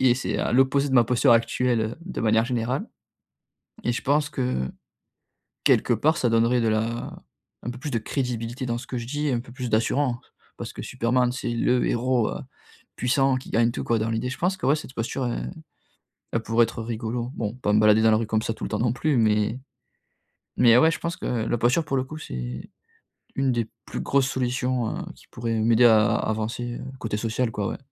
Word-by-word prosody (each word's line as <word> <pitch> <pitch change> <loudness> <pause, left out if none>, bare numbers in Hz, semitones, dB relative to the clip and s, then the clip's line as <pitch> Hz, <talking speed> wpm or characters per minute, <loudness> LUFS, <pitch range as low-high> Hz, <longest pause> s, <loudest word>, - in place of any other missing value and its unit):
et 130 -2 +5
c'est 130 - -2
à - - -1
l'opposé 135 +2 +3
de 130 - -1
ma 120 -2 +6
posture 125 +1 +4
actuelle 115 +1 +2
heu, 110 +2 -2
de 180 +2 -6
manière 110 0 +3
générale. 120 +1 -2 1.0
Et 120 - +1
je - - -3
pense 145 +1 +1
que, 125 - -2 0.9
quelque - - +4
part, 155 +3 +2
ça 120 - +1
donnerait 115 +2 +3
de 115 - +1
la 110 +2 -2 0.5
un 120 - -4
peu 125 - -9
plus 145 +1 -5
de 115 - 0
crédibilité 125 +1 -3
dans 120 -1 -1
ce 125 - -10
que 125 - -4
je 115 - -4
dis, 145 +2 -1
un 120 -2 +1
peu 120 0 -10
plus 125 -1 -5
d'assurant, 120 +3 +1 0.4
parce - - -7
que - - -7
Superman, 125 +1 +1
c'est 125 -1 -3
le 125 +1 +2
héros 120 -1 +1
heu, - - -4 0.6
puissant, 135 +1 +2
qui 130 - -9
gagne 115 +1 +3
tout, - - -4
quoi, 115 -2 +1
dans 110 +1 -1
l'idée. 115 +3 -1
Je 130 - -5
pense 185 +2 0
que, 175 - -4
ouais, 140 - +4
cette 150 -4 -8
posture 120 +2 -2
elle 65 - -4 0.8
elle 115 - +1
pourrait 115 +1 +3
être 115 0 -3
rigolo. 120 +2 -3
Bon, 105 -1 -3
pas 105 -5 -1
me 105 - +5
balader 105 0 +5
dans 110 - +6
la 110 - +4
rue 115 - -1
comme 110 0 +1
ça 115 - -1
tout - - -9
le - - -4
temps - - -1
non 115 -1 +2
plus 140 +2 0
mais 110 +2 +2 1.0
mais, 120 -1 +7
ouais, 160 +5 +5
je - - -3
pense 170 0 -3
que - - -6
la 120 0 -1
posture, 125 +8 +2
pour 135 - -1
le 130 - 0
coup, 155 +4 -9
c'est 65 - -6 0.7
une 135 -1 +1
des 115 -2 -1 0.2
plus - - -5
grosses 135 -1 +2
solutions 125 -2 -1
heu, - - -5
qui - - -20
pourraient 115 -1 -2
m'aider 115 +2 +5
à 110 -2 +5
avancer 110 +2 -2
heu, - - -7 0.2
côté 110 -2 -3
social, 115 +2 -1
quoi, 105 -2 -2
ouais. - - -4
120 Hz, 220 wpm, -25 LUFS, 115-130 Hz, 1.0 s, mais